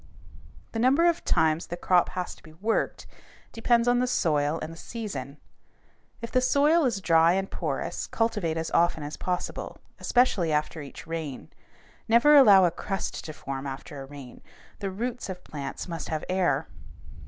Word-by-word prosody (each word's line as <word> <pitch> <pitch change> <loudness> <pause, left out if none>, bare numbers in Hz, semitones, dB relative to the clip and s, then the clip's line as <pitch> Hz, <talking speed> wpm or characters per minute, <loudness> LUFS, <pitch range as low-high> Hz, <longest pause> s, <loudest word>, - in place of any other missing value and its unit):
The 225 - -3
number 270 +8 +4
of 340 0 +1
times 160 -1 +1
the 175 - -5
crop 180 0 +3
has 180 - -3
to - - -18
be 155 - -15
worked 210 +8 -1 0.5
depends 235 +1 +2
on 245 0 +4
the 250 - +1
soil 150 -9 +1
and 165 - -6
the - - -11
season. 165 - -6 0.9
If 230 - -5
the 255 - +3
soil 290 +5 +3
is 230 -6 0
dry 165 -1 +4
and 195 +1 -2
porous, - - -3
cultivate 210 -8 -1
as 160 0 -3
often 170 -2 +2
as 145 +1 -5
possible, 180 -1 -4 0.2
especially 215 -10 +2
after 150 +1 -1
each 140 +1 -10
rain. 160 -5 -6 0.5
Never 235 +7 +6
allow 205 -9 +8
a 175 - +2
crust 195 +3 -4
to 155 - -5
form 135 -2 -6
after 135 +1 -7
a 135 - -9
rain; 135 -3 -11 0.4
the 195 - -3
roots 235 +4 -4
of 180 -1 -7
plants 145 +3 -6
must 165 -4 -5
have 155 -1 -3
air. 175 -6 +1
175 Hz, 170 wpm, -27 LUFS, 155-230 Hz, 0.9 s, allow